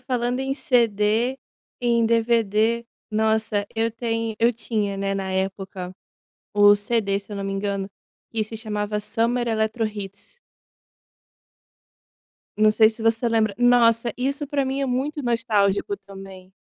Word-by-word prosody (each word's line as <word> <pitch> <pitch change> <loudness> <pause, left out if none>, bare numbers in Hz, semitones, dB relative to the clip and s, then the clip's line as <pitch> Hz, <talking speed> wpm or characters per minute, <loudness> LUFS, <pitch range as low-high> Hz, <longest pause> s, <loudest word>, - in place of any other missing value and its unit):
falando 250 0 -1
em 270 0 -1
CD, 235 -1 +1 0.4
em 235 -1 +2
DVD, 230 0 +2 0.3
nossa, 220 -1 +1
eu 225 +1 +1
ten 225 -1 -2
eu 235 +1 +4
tinha, 215 -3 -2
né, 195 0 -1
na 190 -1 -3
época, 190 -1 -4 0.6
o 205 0 +7
CD, 205 -1 0
se 205 +1 -13
eu - - -4
não 200 - -4
me 195 - -3
engano, 195 0 -2 0.4
que 225 -1 -1
se 220 +1 -7
chamava 210 -1 -3
Summer 235 +3 -1
Eletrohits. 220 - -3 2.2
Não 215 0 +5
sei 220 0 +5
se 220 0 -10
você 225 +1 +2
lembra. 220 -3 +1
Nossa, 240 -1 +4
isso 275 +3 -2
pra 280 -1 0
mim 265 +1 -2
é 275 - 0
muito 275 +4 -2
nostálgico 230 - +1
também. 195 - -12
225 Hz, 135 wpm, -23 LUFS, 205-240 Hz, 2.2 s, o